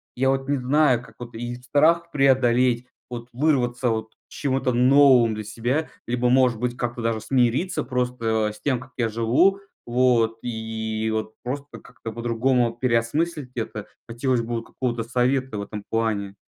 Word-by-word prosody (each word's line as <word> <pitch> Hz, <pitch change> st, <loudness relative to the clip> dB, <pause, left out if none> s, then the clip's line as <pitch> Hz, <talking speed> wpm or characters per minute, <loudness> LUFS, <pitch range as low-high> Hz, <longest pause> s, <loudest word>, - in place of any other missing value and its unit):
Я 130 Hz, +1 st, +1 dB
вот 135 Hz, 0 st, 0 dB
не 145 Hz, -, +1 dB
знаю, 130 Hz, -1 st, +2 dB
как -, -, -16 dB
вот 120 Hz, -1 st, -9 dB
и 120 Hz, +1 st, -4 dB
страх 155 Hz, +7 st, +2 dB
преодолеть, 125 Hz, -3 st, +3 dB, 0.2 s
вот 120 Hz, -1 st, -7 dB
вырваться 125 Hz, -3 st, +1 dB
вот 110 Hz, -1 st, -3 dB
к -, -, -71 dB
чему-то 135 Hz, -2 st, -1 dB
новым 125 Hz, -2 st, +5 dB
для 110 Hz, -, -5 dB
себя, 120 Hz, +8 st, -2 dB, 0.2 s
либо 125 Hz, +1 st, +1 dB
может 125 Hz, -2 st, +4 dB
быть 125 Hz, +1 st, -2 dB
как-то 120 Hz, -1 st, -3 dB
даже 115 Hz, -1 st, 0 dB
смириться 130 Hz, -, +1 dB
просто 115 Hz, -4 st, -1 dB
с 105 Hz, -, -16 dB
тем, 130 Hz, -4 st, 0 dB
как 130 Hz, +1 st, -13 dB
я 115 Hz, -3 st, 0 dB
живу, 115 Hz, -, +2 dB, 0.3 s
вот, 120 Hz, -2 st, +2 dB
и 110 Hz, -1 st, -3 dB
вот 110 Hz, 0 st, -3 dB
просто 140 Hz, +3 st, -6 dB
как-то 115 Hz, -2 st, -9 dB
по-другому 120 Hz, +1 st, +1 dB
переосмыслить 130 Hz, +5 st, 0 dB
это. 110 Hz, -3 st, -5 dB, 0.2 s
Хотелось 120 Hz, +1 st, 0 dB
бы 115 Hz, +1 st, -4 dB
вот 115 Hz, -, -3 dB
какого-то 120 Hz, -3 st, -3 dB
совета 125 Hz, +1 st, 0 dB
в -, -, -3 dB
этом 105 Hz, 0 st, -7 dB
плане. 105 Hz, -3 st, -1 dB
120 Hz, 165 wpm, -24 LUFS, 115-130 Hz, 0.3 s, новым